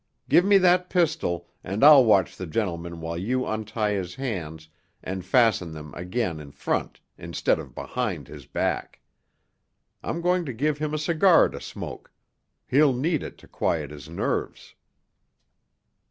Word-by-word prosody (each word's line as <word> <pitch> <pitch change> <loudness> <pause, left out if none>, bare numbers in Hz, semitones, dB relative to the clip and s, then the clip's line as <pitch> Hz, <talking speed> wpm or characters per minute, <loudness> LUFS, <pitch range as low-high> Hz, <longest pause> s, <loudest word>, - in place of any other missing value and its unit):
Give 175 - +5
me 200 +1 +5
that 180 -1 +3
pistol, 155 - 0 0.2
and 100 +7 -2
I'll 145 -2 +9
watch 100 -6 +3
the 95 - -6
gentleman 85 -3 -3
while 85 +1 -4
you 125 +7 -1
untie 110 0 -2
his 95 -3 -3
hands 80 - -5 0.4
and 95 0 -4
fasten 95 -5 +2
them 75 -1 -9
again 90 -1 -3
in 75 -2 -10
front - - -2 0.2
instead - - 0
of - - -10
behind 105 - -3
his 75 -4 -11
back. - - -2 1.0
I'm 170 - -3
going 180 +1 +2
to 130 - -4
give 145 +5 -1
him 155 0 -2
a - - 0
cigar 165 +3 +4
to - - -8
smoke; - - -8 0.5
he'll 140 +1 +4
need 155 +4 0
it - - -8
to - - -17
quiet 75 -4 -2
his 75 0 -10
nerves." 85 - -3
110 Hz, 155 wpm, -25 LUFS, -, 1.0 s, I'll